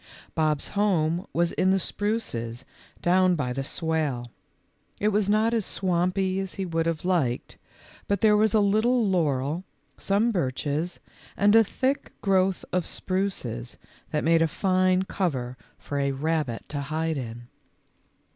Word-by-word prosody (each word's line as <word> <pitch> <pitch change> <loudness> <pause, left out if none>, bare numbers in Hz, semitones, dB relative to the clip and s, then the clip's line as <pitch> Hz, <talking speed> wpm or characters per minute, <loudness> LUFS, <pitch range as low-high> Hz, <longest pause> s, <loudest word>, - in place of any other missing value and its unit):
Bob's 155 -2 0
home 180 -4 +1
was 170 0 +1
in 185 - +1
the 190 - +4
spruces 130 - -3 0.4
down 185 +1 +4
by 125 -6 -2
the 135 +1 -3
swale. 145 -6 -2 0.7
It 210 - +2
was 205 -1 +1
not 215 +2 +3
as 225 -2 +1
swainpy 185 +1 0
as 195 -2 -4
he 195 - -3
would 165 -1 -1
have 165 0 -2
liked, 155 -10 0 0.5
but 200 - 0
there 215 -1 +5
was 215 0 +3
a - - +6
little 220 +3 +3
laurel, 155 -3 0 0.4
some 210 +4 +2
birches, 150 - -2 0.4
and 205 +2 +5
a 225 - +8
thick 260 +6 -2
growth 190 -1 +1
of 180 -2 0
spruces 130 - -3 0.3
that 150 - -1
made 165 +1 +4
a 165 - +4
fine 185 +2 +2
cover 135 -11 -2 0.2
for 145 - -4
a 140 0 +1
rabbit 150 -4 -2
to 145 -1 -3
hide 155 +1 -2
in. 120 -1 -7
175 Hz, 145 wpm, -26 LUFS, 145-195 Hz, 0.7 s, a